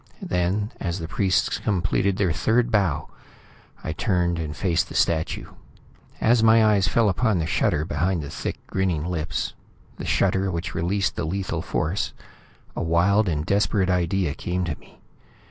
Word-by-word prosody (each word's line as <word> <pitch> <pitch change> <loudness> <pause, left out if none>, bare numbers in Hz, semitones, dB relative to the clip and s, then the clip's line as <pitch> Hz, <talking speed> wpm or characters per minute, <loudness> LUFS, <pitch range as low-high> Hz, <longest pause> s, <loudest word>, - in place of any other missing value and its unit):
Then, 95 +5 0
as 85 -1 -2
the 80 -3 -5
priests 95 +2 +1
completed 95 -1 0
their 95 -4 +2
third 120 +8 +1
bow, 95 -9 +1 0.8
I - - -3
turned 90 -3 0
and 75 -2 -4
faced 90 -4 +1
the - - -9
statue. 80 -1 0 0.7
As 115 0 +4
my 110 0 +6
eyes 100 -3 +3
fell 115 +2 +3
upon 105 +1 +2
the 80 - 0
shutter 75 -1 +1
behind 85 +2 -1
the 70 - -7
thick, - - -4
grinning 90 -5 -1
lips, 85 -4 -2 0.4
the - - -6
shutter 95 0 +2
which 85 0 -3
released 95 +2 0
the - - -1
lethal 95 +4 -2
force, 80 +6 -2 0.6
a - - -2
wild 90 +5 +3
and 75 -2 -1
desperate 100 0 +2
idea 90 -2 +1
came 90 +3 -2
to 80 -4 -2
me. - - -21
90 Hz, 160 wpm, -24 LUFS, 85-100 Hz, 0.8 s, my